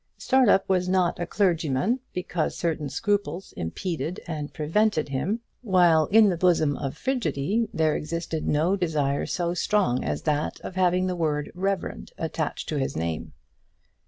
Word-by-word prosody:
Startup 250 -7 +3
was 180 -1 +1
not 185 -2 +2
a 175 - -2
clergyman 175 - +1
because 180 -3 -2
certain 160 -4 -1
scruples 205 +1 -2
impeded 165 - -3
and 150 -3 -5
prevented 160 +1 +1
him, 190 - -1 0.2
while 175 -8 +4
in 215 0 +6
the 175 - 0
bosom 165 -5 +3
of 135 +2 -4
Frigidy 225 - -1
there 160 -6 +1
existed 160 0 -3
no 160 +6 +2
desire 150 -7 0
so 175 -1 -1
strong 180 -8 +1
as 75 0 -2
that 150 0 -1
of - - -7
having 185 0 +2
the 185 -1 -1
word 150 -3 -1
reverend 190 +1 -3
attached 160 -2 -3
to 155 - -1
his 135 - -2
name. 80 -1 -3
170 Hz, 150 wpm, -26 LUFS, 150-190 Hz, 0.2 s, in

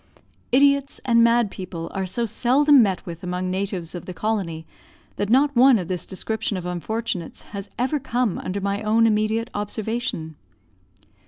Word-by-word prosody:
Idiots 280 +1 +3
and 230 -2 +5
mad 235 -3 +3
people 170 -3 -6
are 190 -1 -2
so 235 +6 -1
seldom 265 +5 +4
met 195 -5 0
with 170 -1 -7
among 180 0 -3
natives 185 -3 -3
of 175 - -7
the 180 - -6
colony, 185 -7 -2 0.5
that 205 - -1
not 280 +4 +3
one 255 0 +7
of 180 -3 -5
this 180 -2 -3
description 210 +1 -3
of 180 - -6
unfortunates 180 0 -4
has 200 -1 -8
ever 260 +5 0
come 245 -5 -1
under 190 +2 -3
my 200 +1 -2
own 220 +1 +3
immediate 220 +2 +1
observation. 210 -5 -3
215 Hz, 160 wpm, -23 LUFS, 185-235 Hz, 0.5 s, one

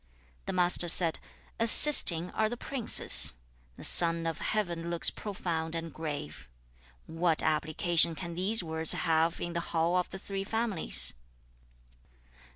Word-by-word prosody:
The - - -4
Master 175 -1 +1
said, 165 -1 +3 0.4
'"Assisting 215 - +5
are 220 0 -2
the 240 - -7
princes; 250 - +2 0.4
the - - -12
son 165 -1 +3
of 165 -2 -5
heaven 175 -6 -4
looks 170 -1 +1
profound 170 -5 -6
and 165 0 -7
grave:" 150 - -8 0.6
what 165 0 -2
application 160 +2 +1
can 170 0 -7
these 190 +4 -1
words 160 -1 +1
have 165 0 -1
in 175 - -6
the 170 - -3
hall 170 +1 -2
of 180 -1 -2
the 190 - -9
three 195 0 -7
families?' 220 -4 +1
170 Hz, 135 wpm, -28 LUFS, 165-190 Hz, 0.6 s, Assisting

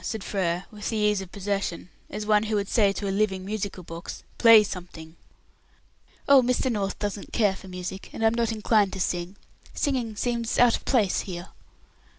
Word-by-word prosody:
said 220 -4 -4
Frere, 180 -2 -1
with 210 -1 -5
the 225 - -2
ease 210 -2 +2
of 185 -2 -10
possession, 200 -3 -3 0.2
as 210 - -5
one 210 -1 +4
who 215 -1 0
should 200 -1 -1
say 205 -4 +3
to 200 0 -4
a - - 0
living 195 -2 0
musical 200 -2 -4
box, 165 +1 -8 0.2
"Play 230 -2 +8
something." 175 -4 -8 1.1
"Oh, 280 -1 +8
Mr. 250 +1 +1
North 200 -3 -2
doesn't 205 -1 -4
care 205 -4 +2
for 190 - -12
music, 185 +1 -6
and 225 - -2
I'm 225 - +4
not 230 -1 0
inclined 215 -2 +2
to 190 - -5
sing. 175 +1 -2 0.4
Singing 250 -7 -1
seems 235 +1 -1
out 245 -1 +5
of - - -8
place 220 -8 +2
here." 175 -1 -6
205 Hz, 185 wpm, -26 LUFS, 190-225 Hz, 1.1 s, Play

